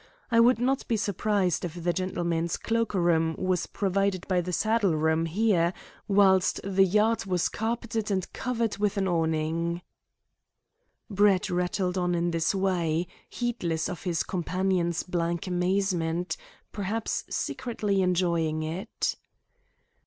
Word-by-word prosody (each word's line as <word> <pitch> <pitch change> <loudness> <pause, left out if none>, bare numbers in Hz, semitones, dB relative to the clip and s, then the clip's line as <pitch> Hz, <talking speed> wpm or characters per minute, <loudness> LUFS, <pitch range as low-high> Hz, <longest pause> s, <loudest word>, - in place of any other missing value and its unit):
I 230 - +5
would 245 +2 +6
not 260 +3 0
be 230 - +1
surprised 200 -3 0
if 175 -2 -4
the 175 0 +1
gentlemen's 170 -3 -1
cloak 230 -2 -1
room 165 -3 +2
was 185 -2 0
provided 195 -1 -1
by 185 -2 +2
the 180 +1 -4
saddle 215 -2 +2
room 160 +1 +1
there, 180 -1 +2 0.3
whilst 195 -2 +4
the 195 0 +3
yard 210 +2 +2
was 180 -3 +1
carpeted 225 -1 -2
and 190 -3 -2
covered 230 -5 -2
with 210 0 0
an 195 -1 +1
awning." 165 0 0 1.2
Brett 200 -1 +3
rattled 180 +1 0
on 180 -1 +1
in 170 0 0
this 165 +3 0
way, 175 -4 0 0.2
heedless 175 -10 -2
of 180 - -6
his 170 -5 -1
companion's 180 -1 -1
blank 170 -1 -2
amazement, 180 -2 0 0.4
perhaps 210 +2 -2
secretly 210 -5 -1
enjoying 170 -4 +1
it. 175 +8 -3
185 Hz, 130 wpm, -27 LUFS, 170-205 Hz, 1.2 s, would